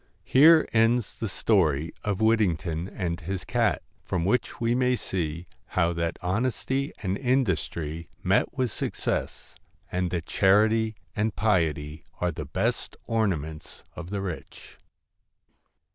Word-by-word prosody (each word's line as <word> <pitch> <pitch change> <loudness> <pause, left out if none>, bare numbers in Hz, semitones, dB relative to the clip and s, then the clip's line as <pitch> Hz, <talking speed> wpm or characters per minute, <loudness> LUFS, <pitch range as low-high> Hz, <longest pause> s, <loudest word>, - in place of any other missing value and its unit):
Here 155 +4 +7
ends 115 0 +3
the 110 - -4
story 80 -7 +2
of 105 -1 -1
Whittington 90 -7 +1
and 90 -4 -3
his 95 +1 -4
cat; - - +1 0.2
from 85 -2 -1
which 125 +6 0
we 115 0 +1
may 125 0 +2
see 85 -6 -3 0.3
how 85 -1 +3
that 85 0 -2
honesty 130 +7 -1
and 95 -1 0
industry 85 - -1
met - - +1
with 125 -3 0
success; - - -3 0.4
and 90 0 0
that 85 -2 -3
charity 110 +4 +3 0.2
and 105 +1 0
piety 80 -7 0 0.2
are 90 0 +1
the - - -6
best - - -2
ornaments 80 -9 -2
of 85 0 -7
the 100 0 -2
rich. 90 -5 -8
95 Hz, 130 wpm, -26 LUFS, 85-115 Hz, 0.4 s, Here